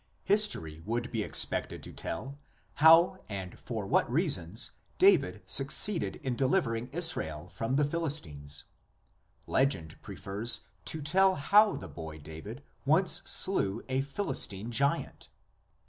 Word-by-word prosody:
History 195 - +2
would 120 +5 -4
be 115 - -2
expected - - 0
to - - -10
tell 135 +11 -7 0.4
how 165 +4 +5
and 95 -3 -7
for 110 -4 -6
what 100 - 0
reasons 120 - 0 0.3
David 150 - +2
succeeded 140 - +5
in 130 -3 -3
delivering 125 -4 -1
Israel 90 - -1
from 115 +8 -4
the 145 +1 +2
Philistines; 135 - -4 0.8
legend 90 - -1
prefers 110 +5 -3 0.2
to 155 -2 -4
tell 190 +5 +2
how 205 +9 +3
the 95 - -8
boy 80 +1 -9
David 80 - -11 0.2
once 160 +7 +2
slew 115 - +3
a 130 +1 0
Philistine 120 - -3
giant. 140 +5 -1
125 Hz, 120 wpm, -29 LUFS, 95-160 Hz, 0.8 s, how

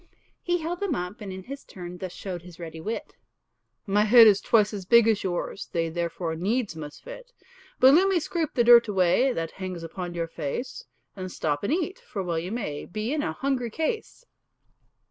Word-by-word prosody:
He 350 0 0
held 340 +1 -4
them 400 -7 -1
up, 180 +6 -5
and 200 -2 -6
in 190 0 -7
his 275 +6 -8
turn 180 -1 -9
Thus 185 -2 -5
showed 180 -1 -6
his 175 -1 -13
ready 160 -1 -7
wit, 220 +6 -5 0.7
"My 205 0 +3
head 230 +1 +9
is 205 -2 +5
twice 215 -2 +3
as 200 -2 -5
big 235 +4 +5
as 220 -2 +2
yours, 185 +1 -3
They 165 -1 0
therefore 170 0 -3
needs 210 +3 -1
must 150 -2 -9
fit. - - -10 0.5
"But 265 +1 +8
let 365 +5 +5
me 385 -3 +2
scrape 320 -1 -3
the 240 - +4
dirt 235 0 +8
away 195 +6 +3
That 165 -8 -3
hangs 185 -3 -6
upon 175 +1 -6
your 165 -1 -2
face; 165 - -5 0.3
And 185 -2 -6
stop 145 -3 -2
and 200 - -1
eat, 360 +3 -1
for 195 - -5
well 170 -2 -1
you 175 +4 -5
may 175 -11 -4
Be 215 +7 -3
in 305 - 0
a 305 - -2
hungry 265 -3 -1
case." 435 - -3
205 Hz, 205 wpm, -26 LUFS, 175-260 Hz, 0.7 s, head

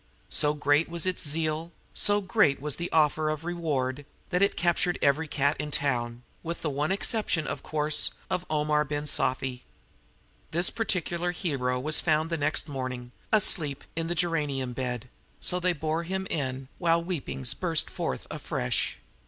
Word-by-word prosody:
So 150 0 +2
great 145 +2 +2
was 170 0 -1
its 185 -1 0
zeal 160 +2 -1 0.2
so 205 0 +4
great 190 -7 +3
was 150 0 -1
the 175 0 -3
offer 155 0 +3
of 155 +1 -3
reward 145 -6 -1 0.3
that 180 +1 +2
it 200 - +3
captured 175 0 +2
every 145 +3 +2
cat 145 0 +1
in 150 - -2
town, 120 -4 -1 0.2
with 170 0 -5
the 155 - 0
one 145 +5 0
exception, 200 -4 +1
of - - -4
course, 150 0 +1 0.2
of 180 - -1
Omar 150 0 +2
Ben 145 0 -3
Sufi. 130 -3 0 0.9
This 175 +2 +2
particular 175 -5 -1
hero 130 -9 -1
was 150 +4 +2
found 160 0 +1
next 145 +3 +2
morning, 130 -3 -4 0.2
asleep, 160 -9 +3
in 165 0 -1
the 175 - -1
geranium 150 -7 0
bed; 125 -1 -3 0.3
so 180 - 0
they 180 0 +3
bore 160 +1 -1
him 190 +3 -3
in, 130 -3 -2
while 170 -1 +3
weepings 135 -7 -2
burst 165 -4 +1
forth 65 - -3
afresh. 60 - -1
155 Hz, 160 wpm, -28 LUFS, 140-170 Hz, 0.9 s, so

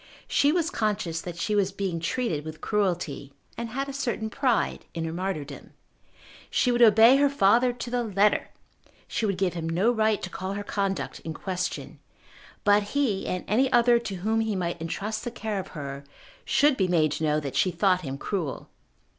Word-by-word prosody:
She 285 +1 +3
was 340 +1 0
conscious 205 -7 -1
that 175 -1 -7
she 210 +5 -1
was 200 -2 +2
being 190 -3 -3
treated 170 -4 -1
with 155 0 -8
cruelty, 175 -9 -1 0.2
and 235 -1 -5
had 270 +4 -3
a 275 - -6
certain 235 -5 -2
pride 255 -3 0
in 165 -1 -2
her 160 - -4
martyrdom. 160 -6 -5 0.8
She 250 - +2
would 240 0 +1
obey 225 +3 +7
her 285 0 +4
father 245 -1 +4
to 240 0 -6
the 245 0 +1
letter; 205 -1 +2 0.6
she 220 - -1
would 195 -2 -1
give 185 -2 0
him 165 -2 -4
no 185 +8 +2
right 220 -2 +2
to - - -3
call 190 +1 -4
her 205 +1 -4
conduct 195 -2 -2
in 160 -1 -6
question; 180 0 -4 0.6
but 205 0 +5 0.2
he 230 -9 +1
and 180 - -2
any 255 +5 +2
other 240 0 +5
to 215 -4 -5
whom 215 +5 0
he 220 -2 -1
might 175 -2 -3
entrust 210 +6 -3
the 240 - -3
care 220 -3 -4
of 190 - -6
her, 140 -1 -6 0.4
should 290 -2 +3
be 190 - +2
made 160 -4 +2
to 160 - -3
know 150 0 +2
that 140 -3 -5
she 185 - +3
thought 185 +1 +2
him 135 -4 -5
cruel. 165 -4 -4
200 Hz, 195 wpm, -26 LUFS, 170-235 Hz, 0.8 s, obey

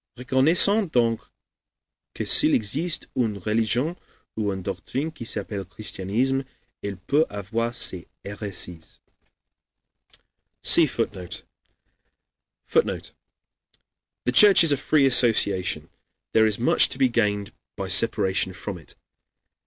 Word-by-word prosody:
Reconnaissons 160 - +1
donc 115 -4 +1 0.9
que - - -4
s'il - - +3
existe 150 +11 -2
une 115 -5 -1
religion 115 - -1 0.4
ou 105 -2 -2
une 95 -1 -6
doctrine 100 - -4
qui 135 -7 -10
s'appelle 100 -2 -5
christianisme, 110 +7 -3 0.4
elle 100 -2 -5
peut 140 - 0
avoir 115 +4 -4
ses 90 -7 -4 0.2
hérésies." 100 -5 -7 1.7
[see 165 -2 +6
Footnote] 100 -8 -5 1.2
[Footnote: - - -1 1.1
"The 125 - +1
Church 205 0 +8
is 165 - +6
a 140 - +2
free 140 +1 +2
association; 115 -7 +3 0.4
there 110 0 +4
is 105 -2 +1
much 120 - +4
to - - -3
be 135 -1 +3
gained 105 -4 -1 0.2
by - - -5
separation 95 0 +2
from 95 -1 -7
it. 80 - -17
110 Hz, 115 wpm, -23 LUFS, 100-135 Hz, 1.7 s, Church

